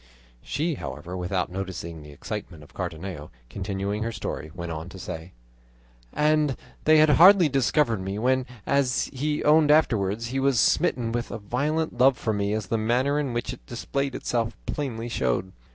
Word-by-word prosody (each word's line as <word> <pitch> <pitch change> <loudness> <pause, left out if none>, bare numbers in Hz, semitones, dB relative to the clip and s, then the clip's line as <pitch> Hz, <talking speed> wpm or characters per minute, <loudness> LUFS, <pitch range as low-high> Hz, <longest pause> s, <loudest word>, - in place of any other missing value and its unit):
She, 160 +5 -1
however, 80 - -6
without 90 0 -2
noticing 90 -4 -5
the 75 - -12
excitement 85 +1 -7
of 75 - -18
Cardenio, 80 -2 -5 0.2
continuing 100 - -3
her 115 +1 -1
story, 105 -7 -5
went 85 -2 -5
on 80 +2 -5
to 95 - -10
say: 85 -1 -7 0.8
"And 150 -2 +2 0.3
they 155 0 +6
had 155 0 +6
hardly 180 +2 +8
discovered 135 -4 +1
me, 95 +2 -4
when, 130 +3 +1 0.2
as 135 -2 +1
he 150 +3 -1
owned 150 0 +5
afterwards, 115 -7 +2
he 135 +2 -1
was 135 -2 +2
smitten 125 -8 +2
with 120 0 -2
a - - -4
violent 140 +8 -2
love 130 0 +5
for 110 - -1
me, 100 0 -1
as 110 -2 -2
the 110 +4 -1
manner 125 +6 +1
in 140 -4 -1
which 120 0 -2
it - - -13
displayed 135 +3 -3
itself 115 -2 -2
plainly 120 -6 -3
showed. 80 - -1
115 Hz, 170 wpm, -26 LUFS, 95-140 Hz, 0.8 s, hardly